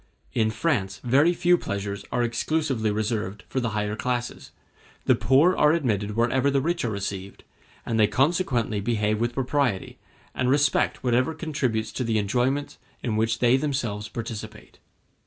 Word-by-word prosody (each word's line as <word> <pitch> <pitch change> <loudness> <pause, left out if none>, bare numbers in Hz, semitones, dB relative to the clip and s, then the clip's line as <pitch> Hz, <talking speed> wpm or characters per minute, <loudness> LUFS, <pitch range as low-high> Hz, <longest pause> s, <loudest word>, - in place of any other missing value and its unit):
In 110 -1 +2
France 110 -5 -1
very 140 +7 +4
few 175 0 +3
pleasures 100 0 -4
are 120 - +1
exclusively 120 0 0
reserved 105 -1 -2
for 130 - -2
the 125 -2 -1
higher 105 0 -1
classes; 120 +1 -3 0.6
the - - +5
poor 145 +8 +4
are 150 +1 +4
admitted 105 - -1
wherever 125 +4 +2
the 140 0 +2
rich 170 +5 -1
are 120 - 0
received, 100 -1 -5 0.4
and 115 -1 -1
they 105 - +6
consequently 125 - +1
behave 105 0 0
with 120 +1 -1
propriety, 130 -6 -1 0.3
and 130 -1 0
respect 140 0 +2
whatever 125 +5 +1
contributes 140 -9 -2
to 130 - -3
the 115 -2 0
enjoyments 125 +7 0 0.2
in 115 -3 -1
which 110 +1 +1
they 120 +2 +4
themselves 120 -7 -2
participate. 110 -2 -7
120 Hz, 155 wpm, -25 LUFS, 110-135 Hz, 0.6 s, they